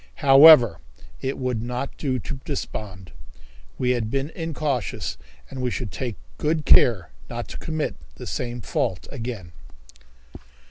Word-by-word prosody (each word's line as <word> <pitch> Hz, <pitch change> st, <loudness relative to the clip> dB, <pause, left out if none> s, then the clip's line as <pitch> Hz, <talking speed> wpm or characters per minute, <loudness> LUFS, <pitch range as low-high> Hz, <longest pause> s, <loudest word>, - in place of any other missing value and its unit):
However, 135 Hz, -, +8 dB, 0.4 s
it 135 Hz, +1 st, -2 dB
would 125 Hz, -4 st, -2 dB
not 125 Hz, +3 st, -4 dB
do 130 Hz, -4 st, -1 dB
to 135 Hz, +3 st, -6 dB
despond. 95 Hz, -, -6 dB, 0.7 s
We 125 Hz, -, +1 dB
had 120 Hz, -3 st, -1 dB
been 135 Hz, +4 st, -2 dB
incautious, 140 Hz, -, -3 dB, 0.3 s
and 135 Hz, -1 st, -7 dB
we 125 Hz, -, 0 dB
should 120 Hz, -3 st, -4 dB
take 120 Hz, -5 st, -4 dB, 0.2 s
good 155 Hz, 0 st, 0 dB
care 95 Hz, -, +5 dB, 0.2 s
not -, -, -5 dB
to -, -, -7 dB
commit 155 Hz, -2 st, -2 dB, 0.2 s
the -, -, -9 dB
same 120 Hz, -1 st, -4 dB
fault 95 Hz, -2 st, -2 dB
again. 115 Hz, -8 st, -6 dB
125 Hz, 135 wpm, -24 LUFS, 110-140 Hz, 0.7 s, However